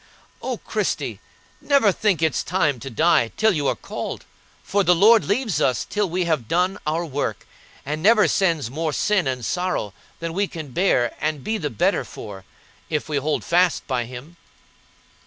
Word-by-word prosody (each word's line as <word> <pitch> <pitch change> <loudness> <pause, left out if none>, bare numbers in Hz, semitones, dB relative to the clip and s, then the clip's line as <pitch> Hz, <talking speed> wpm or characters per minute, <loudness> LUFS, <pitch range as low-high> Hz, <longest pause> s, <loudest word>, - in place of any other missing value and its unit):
O - - -3
Christie! - - -2 0.4
never 275 -8 +4
think 190 -4 0
it's 155 -6 +1
time 150 -8 0
to 135 - -7
die 130 -2 +3
till 220 0 +4
you 150 -7 -1
are - - +1
called; - - -6 0.4
for 200 +1 +1
the 180 -1 +4
Lord 215 +5 +6
leaves 215 - 0
us 125 - +1
till 210 -2 -1
we 180 +1 -1
have 155 -9 0
done 180 - +1
our 165 +3 0
work, 145 -2 -3 0.4
and 150 +3 -3
never 210 +2 +5
sends 165 - +1
more 155 +2 -2
sin 200 -4 +1
and 125 -3 -2
sorrow 180 - -2 0.3
than 165 -1 -4
we 200 +3 0
can 160 -5 -7
bear 125 -5 +1
and 155 -3 -2
be 220 0 -1
the 150 - -2
better 110 - +1
for, 95 -2 -9 0.5
if 150 -2 -2
we 150 -2 -1
hold 150 +2 -1
fast 175 +1 +2
by 125 -3 -1
Him." 130 +8 -10
165 Hz, 175 wpm, -22 LUFS, 140-190 Hz, 0.5 s, Lord